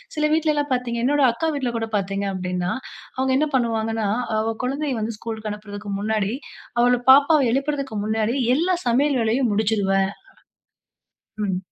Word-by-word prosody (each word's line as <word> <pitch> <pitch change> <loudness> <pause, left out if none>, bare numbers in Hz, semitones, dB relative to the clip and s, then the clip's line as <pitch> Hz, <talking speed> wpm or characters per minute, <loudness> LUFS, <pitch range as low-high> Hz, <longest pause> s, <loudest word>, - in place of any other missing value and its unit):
சில 300 0 +1
வீட்லலாம் 300 -3 +1
பார்த்திங்க, 240 -2 -2
என்னோட 290 +1 +3
அக்கா 320 +7 -1
வீட்ல 255 -4 -1
கூட 225 -1 -3
பாத்தீங்க 195 0 -2
அப்டின்னா, 180 -1 -2 0.5
அவங்க 260 0 +1
என்ன 305 - +2
பண்ணுவாங்கன்னா, 225 -3 0 0.3
அவ 225 0 -1
குழந்தைய 275 -2 -2
வந்து 220 0 -3
ஸ்கூல் 225 0 -5
லுக்கு 215 -1 -4
அனுப்பறதுக்கு 205 0 -8
முன்னாடி, 215 0 0 0.5
அவள 245 0 +3
பாப்பாவை 285 0 +6
எழுப்பறதுக்கு 275 -4 -2
முன்னாடி, 220 +2 0 0.2
எல்லா 360 +4 +2
சமையல் 270 +3 +2
வேலையும் 230 +1 +1
முடிச்சுருவேன் 200 -2 +1 1.4
ம். 185 -2 -1
230 Hz, 145 wpm, -22 LUFS, 210-275 Hz, 1.4 s, பாப்பாவை